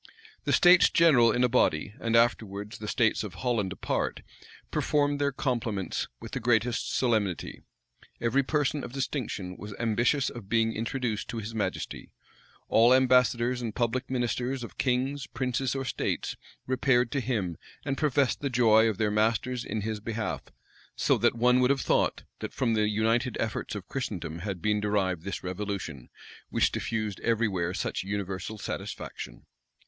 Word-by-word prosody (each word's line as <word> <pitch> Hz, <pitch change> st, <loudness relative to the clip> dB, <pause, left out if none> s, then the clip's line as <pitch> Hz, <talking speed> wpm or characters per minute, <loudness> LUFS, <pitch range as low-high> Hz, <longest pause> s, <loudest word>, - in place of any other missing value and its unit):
The -, -, +1 dB
states 180 Hz, 0 st, +7 dB
general 135 Hz, -9 st, +5 dB
in 125 Hz, -, +1 dB
a -, -, +5 dB
body, 105 Hz, -7 st, +1 dB
and 115 Hz, 0 st, 0 dB
afterwards 110 Hz, -2 st, +1 dB
the 105 Hz, -, -6 dB
states 110 Hz, -1 st, +2 dB
of 105 Hz, -, -7 dB
Holland 115 Hz, -7 st, -1 dB
apart, 95 Hz, -, -2 dB, 0.5 s
performed 145 Hz, -1 st, +1 dB
their 140 Hz, 0 st, +2 dB
compliments 115 Hz, -8 st, -2 dB
with -, -, -9 dB
the -, -, -2 dB
greatest 120 Hz, 0 st, +1 dB
solemnity: 110 Hz, -8 st, 0 dB, 0.6 s
every 120 Hz, +4 st, +2 dB
person 145 Hz, +1 st, 0 dB
of 120 Hz, -, -7 dB
distinction 125 Hz, -9 st, -3 dB
was 105 Hz, -1 st, -8 dB
ambitious 120 Hz, +5 st, +1 dB
of 110 Hz, -5 st, -10 dB
being 115 Hz, 0 st, +2 dB
introduced 115 Hz, -1 st, -2 dB
to 115 Hz, -, -5 dB
his 110 Hz, +1 st, -5 dB
majesty; 110 Hz, -2 st, -3 dB, 0.6 s
all 120 Hz, +3 st, +6 dB
ambassadors 125 Hz, -1 st, +3 dB
and 115 Hz, -3 st, -4 dB
public 125 Hz, +2 st, -1 dB
ministers 125 Hz, +1 st, -1 dB
of 100 Hz, -7 st, -10 dB
kings, 130 Hz, +2 st, 0 dB
princes, 125 Hz, +1 st, -1 dB
or 135 Hz, -1 st, -2 dB
states, -, -, -2 dB, 0.3 s
repaired 130 Hz, -2 st, +2 dB
to 140 Hz, -, 0 dB
him, 105 Hz, -9 st, -1 dB, 0.3 s
and 135 Hz, -, 0 dB
professed 140 Hz, -3 st, +1 dB
the 140 Hz, -, -1 dB
joy 115 Hz, -3 st, +5 dB
of 105 Hz, -, -3 dB
their 105 Hz, -1 st, +1 dB
masters 115 Hz, +4 st, +1 dB
in 110 Hz, +1 st, -3 dB
his 110 Hz, +1 st, -3 dB
behalf; 110 Hz, +1 st, -3 dB, 0.5 s
so -, -, +3 dB
that -, -, +2 dB
one 125 Hz, +2 st, +4 dB
would 125 Hz, 0 st, +3 dB
have 140 Hz, -2 st, +2 dB
thought, -, -, +1 dB, 0.2 s
that -, -, -5 dB
from 120 Hz, -4 st, +1 dB
the 105 Hz, -1 st, +2 dB
united 115 Hz, +3 st, +1 dB
efforts 110 Hz, -1 st, -2 dB
of 100 Hz, -3 st, -7 dB
Christendom 95 Hz, -, -4 dB
had 90 Hz, -1 st, -5 dB
been 105 Hz, -1 st, +2 dB
derived 100 Hz, -5 st, 0 dB
this 100 Hz, +3 st, -5 dB
revolution, 95 Hz, -7 st, -5 dB, 0.4 s
which -, -, +2 dB
diffused 110 Hz, -3 st, -2 dB
every 115 Hz, -1 st, +1 dB
where 90 Hz, -3 st, -1 dB
such -, -, -2 dB
universal 100 Hz, +1 st, -4 dB
satisfaction. 60 Hz, -10 st, -6 dB
115 Hz, 160 wpm, -28 LUFS, 105-125 Hz, 0.6 s, states